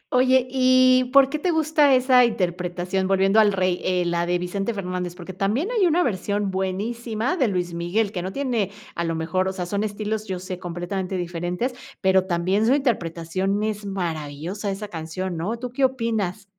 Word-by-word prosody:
Oye 255 0 +4
y 255 0 +4
¿por 275 -1 +7
qué 305 +1 -3
te 360 - 0
gusta 310 -4 +4
esa 255 0 +5
interpretación?, 180 -2 -1
volviendo 195 +2 +3
a - - +9
El 205 - +3
Rey, 185 -2 0
eh, 180 -1 +1
la 170 0 0
de 180 0 +1
Vicente 195 +5 -2
Fernández, 180 -2 -4
porque 180 +1 -9
también 210 - 0
hay 415 -7 +3
una 340 +2 +3
versión 205 -2 -1
buenísima 220 - -2
de 270 -9 +2
Luis 180 -3 -2
Miguel 190 +5 0
que 180 - -3
no 185 +1 -4
tiene, 245 -7 -1 0.2
a 170 - -2
lo 165 0 -1
mejor, 165 +4 -1
o 190 - -2
sea, 180 -2 -4
son 200 +3 -2
estilos, 215 +1 -3
yo 185 -1 -3
sé, 185 0 -6
completamente 180 +1 -4
diferentes, 175 +8 -2 0.3
pero 190 -1 +3
también 185 +5 +1
su 265 - +5
interpretación, 190 - -1
es 210 -1 -3
maravillosa 170 +1 -4
esa 200 +2 -4
canción, 175 +1 -5
¿no?, 190 +8 -2
¿tú 245 +1 -6
qué 270 +2 -1
opinas? 225 -6 0
195 Hz, 190 wpm, -23 LUFS, 180-235 Hz, 0.3 s, a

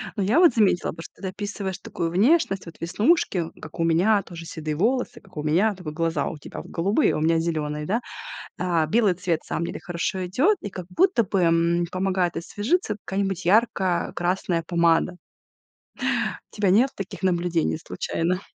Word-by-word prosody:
Но 205 - 0
я 215 - +3
вот 345 -8 +6
заметила 205 -6 +3
бы, 165 - -9
что - - -14
ты 195 - -3
описываешь 195 -1 -4
такую 165 - -3
внешность, 195 - +2
вот 165 - -10
веснушки- 185 - +2 0.2
как 160 - -10
у - - +2
меня, 180 +6 +3
тоже 170 -2 -9
седые 155 -2 -4
волосы- 245 - 0
как - - -18
у 150 - -2
меня, 185 +8 +2
только 180 -5 -7
глаза 165 +1 -1
у 160 - -5
тебя 145 - -8
вот - - -13
голубые, 200 - +2
а - - -1
у - - -2
меня 165 +1 +3
зелёные, 150 -2 -2
да. 220 +9 0 0.6
А, 170 -3 +1
белый 210 +2 +3
цвет, 175 -2 -1
на - - -23
самом 170 - -1
деле, - - -5
хорошо 180 +2 -2
идет, 275 - +2
и 205 - -5
как 185 -2 -7
будто 340 - +3
бы, 195 0 0
м, 170 0 +3
помогает 185 -2 0
освежиться 210 - -1
какая-нибудь 195 -2 -2
ярко-красная 185 -4 +1
помада. 170 +1 +2 1.4
У - - -13
тебя 205 -2 +2
нет 230 +8 +5
таких 195 0 -7
наблюдений 175 -3 +1
случайно? 175 +3 -2
180 Hz, 180 wpm, -24 LUFS, 165-205 Hz, 1.4 s, вот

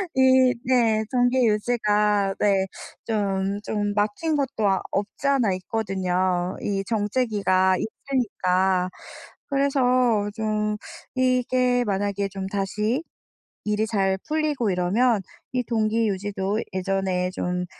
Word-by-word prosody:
이 260 -1 +5
네, 230 -4 +3
동기 245 0 +3
유지가 210 -2 +1
네, 195 -2 +2 0.4
좀 200 -2 -1
좀 205 -1 -1
막힌 215 +10 0
것도 220 -9 +1
없지 205 +8 -2
않아 255 -8 +3
있거든요. 185 -2 -1
이 195 -1 -2
정체기가 205 -4 +1
있으니까. 190 -7 0 0.6
그래서 275 -1 +1
어 245 -5 +2
좀 210 -1 -1 0.4
이게 255 -1 +2
만약에 200 -1 -1
좀 195 0 -5
다시 210 - -1 0.6
일이 210 +1 0
잘 195 -3 0
풀리고 300 -7 0
이러면 200 +6 +2 0.3
이 250 -1 0
동기 225 -1 +1
유지도 200 +1 -2
예전에 185 -1 -1
좀 180 -1 -2
210 Hz, 210 characters per minute, -24 LUFS, 195-245 Hz, 0.6 s, 이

